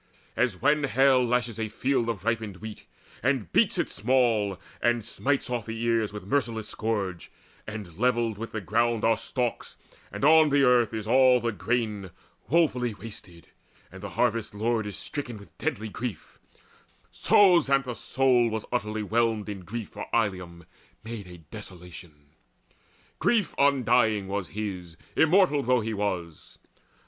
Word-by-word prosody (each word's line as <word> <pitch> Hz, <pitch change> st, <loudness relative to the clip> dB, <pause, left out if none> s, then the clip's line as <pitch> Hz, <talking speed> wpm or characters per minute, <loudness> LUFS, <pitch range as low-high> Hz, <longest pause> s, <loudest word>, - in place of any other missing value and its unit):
As 115 Hz, -8 st, 0 dB
when 145 Hz, +4 st, +2 dB
hail 130 Hz, -1 st, +4 dB
lashes 120 Hz, -2 st, -1 dB
a 110 Hz, -1 st, -2 dB
field 125 Hz, 0 st, 0 dB
of 105 Hz, -4 st, -4 dB
ripened 110 Hz, -5 st, -1 dB
wheat, 110 Hz, +1 st, -9 dB, 0.3 s
And 130 Hz, -6 st, 0 dB
beats -, -, +3 dB
it -, -, -1 dB
small, 115 Hz, -5 st, +1 dB, 0.2 s
and 120 Hz, -2 st, +1 dB
smites 135 Hz, +4 st, -1 dB
off 120 Hz, -4 st, -3 dB
all -, -, -20 dB
the 115 Hz, 0 st, -5 dB
ears 115 Hz, -2 st, +1 dB
With 105 Hz, -2 st, -8 dB
merciless 115 Hz, -2 st, -1 dB
scourge, 100 Hz, -6 st, -3 dB, 0.4 s
and 105 Hz, -5 st, -8 dB
levelled 120 Hz, -3 st, +1 dB
with 115 Hz, -, -6 dB
the 110 Hz, -, -4 dB
ground 115 Hz, +4 st, +1 dB
Are 115 Hz, 0 st, +4 dB
stalks, 120 Hz, +1 st, -4 dB, 0.3 s
and -, -, -2 dB
on 155 Hz, 0 st, +7 dB
the 140 Hz, 0 st, +3 dB
earth 125 Hz, -3 st, +4 dB
is 110 Hz, -2 st, -4 dB
all 130 Hz, +2 st, +5 dB
the 120 Hz, 0 st, -1 dB
grain 105 Hz, 0 st, -2 dB, 0.4 s
Woefully 125 Hz, -8 st, +2 dB
wasted, 100 Hz, -5 st, -11 dB, 0.4 s
and -, -, -11 dB
the -, -, -6 dB
harvest's 115 Hz, -3 st, 0 dB
lord 110 Hz, 0 st, 0 dB
Is 105 Hz, -, -5 dB
stricken 130 Hz, -6 st, -5 dB
with 100 Hz, -3 st, -16 dB
deadly 110 Hz, +2 st, -2 dB
grief; 105 Hz, -4 st, -6 dB, 0.7 s
so 190 Hz, -4 st, +5 dB
Xanthus' 135 Hz, -4 st, 0 dB
soul 125 Hz, -2 st, +2 dB
Was 110 Hz, -1 st, -4 dB
utterly 110 Hz, -3 st, -2 dB
whelmed 110 Hz, -1 st, 0 dB
in 100 Hz, -2 st, -5 dB
grief 105 Hz, +5 st, -6 dB
for -, -, -8 dB
Ilium 90 Hz, -6 st, -2 dB, 0.4 s
made 110 Hz, -3 st, -7 dB
A 90 Hz, -1 st, -11 dB
desolation; 85 Hz, -4 st, -12 dB, 0.9 s
grief 220 Hz, -6 st, +2 dB
undying 120 Hz, -7 st, +3 dB
was 100 Hz, -2 st, -3 dB
his, 90 Hz, -6 st, -5 dB, 0.2 s
Immortal 160 Hz, -2 st, +4 dB
though 125 Hz, -1 st, +2 dB
he 110 Hz, +1 st, -3 dB
was. 90 Hz, -6 st, -4 dB
115 Hz, 155 wpm, -27 LUFS, 105-125 Hz, 0.9 s, on